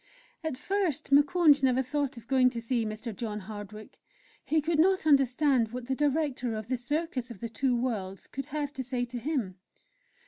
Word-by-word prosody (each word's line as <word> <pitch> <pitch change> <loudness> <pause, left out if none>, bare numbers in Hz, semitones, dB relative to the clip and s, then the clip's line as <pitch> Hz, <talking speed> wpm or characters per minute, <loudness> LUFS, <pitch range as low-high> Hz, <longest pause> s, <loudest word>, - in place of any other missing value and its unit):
At 315 -5 -3
first 345 -6 -1
Moukounj 295 +1 +5
never 260 -1 +3
thought 280 -1 -2
of 230 - -11
going 255 0 +4
to 240 -2 -5
see 230 -1 -1
Mr. 215 +1 -5
John 215 -1 -4
Hardwick. 210 +1 -9 0.4
He 315 - +2
could 310 +1 0
not 375 +1 +3
understand 275 -3 +4
what 250 -1 -5
the 265 - -1
Director 280 -4 0
of 215 +1 -6
the 255 - 0
"Circus 265 0 -2
of 230 -5 -9
the 230 - -4
Two 250 +3 0
Worlds" 200 -6 -3
could 275 0 -6
have 295 -1 -3
to 260 - -4
say 250 -1 -2
to 245 0 -6
him. 235 - -2
255 Hz, 185 wpm, -29 LUFS, 230-295 Hz, 0.4 s, Moukounj